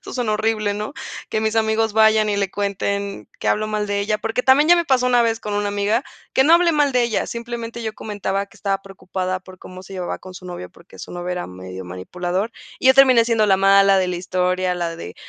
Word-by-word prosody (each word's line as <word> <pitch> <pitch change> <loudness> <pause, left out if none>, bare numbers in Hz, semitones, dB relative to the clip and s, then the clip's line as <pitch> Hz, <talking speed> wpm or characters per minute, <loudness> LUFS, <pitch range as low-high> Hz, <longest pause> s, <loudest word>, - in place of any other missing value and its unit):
Eso - - -9
sonó 240 -4 -1
horrible, 215 -1 0
¿no? 210 +7 -5 0.4
Que 220 - 0
mis 220 0 0
amigos, 220 0 +1
vayan 220 -1 +4
y 205 - 0
le 200 -2 -1
cuenten 200 0 -3
que - - -6
hablo 215 +1 +1
mal 210 -1 -2
de 205 0 -1
ella. 210 +1 -1
Porque 225 +3 -2
también 285 +4 +5
ya 350 - +8
me 340 - +1
pasó 255 -3 +2
una 245 -1 +4
vez, 225 -1 0
con 210 -1 -4
una 205 0 0
amiga, 205 +4 0 0.3
que 265 - +4
no 320 +4 +6
hablé 340 -1 +4
mal 295 -2 +2
de 250 -1 +3
ella, 230 -2 -1
simplemente, 235 0 -6
yo 220 - -3
comentaba 200 -2 -3
que - - -20
estaba 195 -1 -2
preocupada 185 -1 -4
por 185 -1 -14
cómo 185 0 -11
se 195 - -12
llevaba 180 -2 -4
con 185 -1 -12
su 180 - -11
novio, 180 0 -7
porque 170 - -18
su - - -9
novio 175 0 -5
era 180 0 -3
medio 95 0 -9
manipulador. 175 - -3 0.3
Y 260 - +4
yo 260 - +7
terminé 255 -4 +6
siendo 225 -2 +2
la 190 -1 +4
mala 195 0 +5
de 185 -1 +1
la 180 - -2
historia, 180 0 0
la 170 -1 -3
de: 90 - -8
205 Hz, 245 wpm, -21 LUFS, 185-225 Hz, 0.4 s, ya